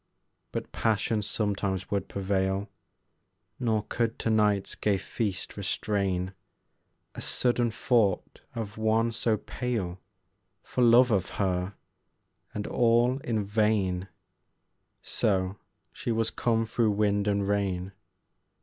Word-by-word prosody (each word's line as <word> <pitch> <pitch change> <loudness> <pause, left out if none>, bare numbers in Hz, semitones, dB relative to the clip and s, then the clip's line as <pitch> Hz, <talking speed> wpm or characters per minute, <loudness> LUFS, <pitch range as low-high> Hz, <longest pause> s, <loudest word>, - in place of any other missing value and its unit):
But - - -4
passion 110 0 +1
sometimes 100 -2 -2
would 100 -1 0
prevail, 95 0 -1 0.9
Nor 110 -4 +1
could 115 -1 -1
to 115 - 0
night's 105 -2 +2
gay 100 -2 +1
feast 100 -1 -3
restrain 100 -1 -1 0.8
A - - -7
sudden 120 -1 +2
thought 110 -3 +1
of 110 -2 -5
one 110 +1 +2
so 115 -1 +1
pale 105 -6 -3 0.6
For 125 - 0
love 120 +1 +6
of 95 -4 +1
her, 95 0 0 0.8
and 105 - -4
all 120 +2 +3
in 115 -5 -1
vain: 100 -3 +1 1.0
So, 95 -1 0 0.4
she - - -3
was 115 0 +1
come 115 -1 +1
through 110 -1 +1
wind 100 0 +1
and 100 -1 +1
rain. 95 -2 0
105 Hz, 115 wpm, -28 LUFS, 95-115 Hz, 1.0 s, love